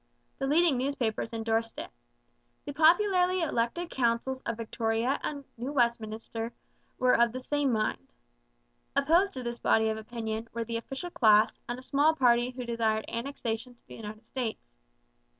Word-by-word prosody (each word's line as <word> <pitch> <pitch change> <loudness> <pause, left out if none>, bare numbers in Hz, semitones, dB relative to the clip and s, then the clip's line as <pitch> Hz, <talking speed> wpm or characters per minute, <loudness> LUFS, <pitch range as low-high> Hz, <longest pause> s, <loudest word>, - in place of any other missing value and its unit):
The 270 - -1
leading 305 -2 +3
newspapers 250 -4 -1
endorsed 225 0 -1
it. - - -6 0.7
The 285 - -5
popularly 360 +3 +4
elected 310 +4 -1
councils 255 +1 0
of 230 - -2
Victoria 230 +3 -1
and 285 -2 -4
New 250 +4 -4
Westminster 230 -2 -1 0.4
were 255 -1 +4
of 235 -1 +4
the 255 - -5
same 285 +1 0
mind. 215 - -1 0.8
Opposed 340 +8 +4
to 255 - -5
this 240 0 -4
body 220 0 +3
of 220 - -2
opinion 220 0 -4
were 230 0 -2
the 230 0 -3
official 270 +9 -6
class 215 -5 +4
and 240 - -2
a 255 - -10
small 290 +4 +3
party 245 -3 +4
who 250 -1 -6
desired 225 -2 0
annexation 235 -1 -4
to - - -38
the - - -10
United 215 +1 -9
States. 240 -2 -4
240 Hz, 155 wpm, -29 LUFS, 225-275 Hz, 0.8 s, popularly